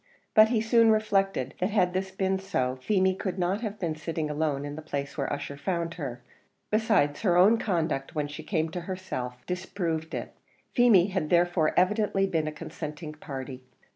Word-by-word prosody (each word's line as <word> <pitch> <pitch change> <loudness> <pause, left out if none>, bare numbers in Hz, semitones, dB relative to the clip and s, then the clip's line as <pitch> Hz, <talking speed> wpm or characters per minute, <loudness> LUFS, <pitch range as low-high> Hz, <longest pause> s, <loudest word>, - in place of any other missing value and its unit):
But 215 -1 +8
he 230 -2 +2
soon 230 0 +4
reflected 195 - +1
that 185 - +1
had 185 -4 +2
this 190 +1 -1
been 190 0 0
so, 130 -10 -1
Feemy 190 +4 +2
could 190 0 -4
not 185 +4 0
have 215 -3 -4
been 170 -5 -2
sitting 155 0 -3
alone 150 -2 -1
in 145 0 -5
the 155 - -7
place 140 -2 -4
where 140 -3 -2
Ussher 145 0 -4
found 170 +1 -2
her; 130 -8 -6 0.5
besides, 210 -10 +2
her 180 -5 +3
own 210 +6 +6
conduct 160 -10 -1
when 150 -1 0
she 145 - -8
came 160 -4 -1
to 175 +2 -5
herself 125 -10 -5
disproved 175 -3 -3
it. - - -5 0.4
Feemy 215 -7 +5
had 185 -5 -2
therefore 175 -2 +3
evidently 195 +1 +2
been 160 -5 0
a - - -2
consenting 155 0 -7
party. 135 -3 -7
175 Hz, 180 wpm, -28 LUFS, 150-195 Hz, 0.5 s, But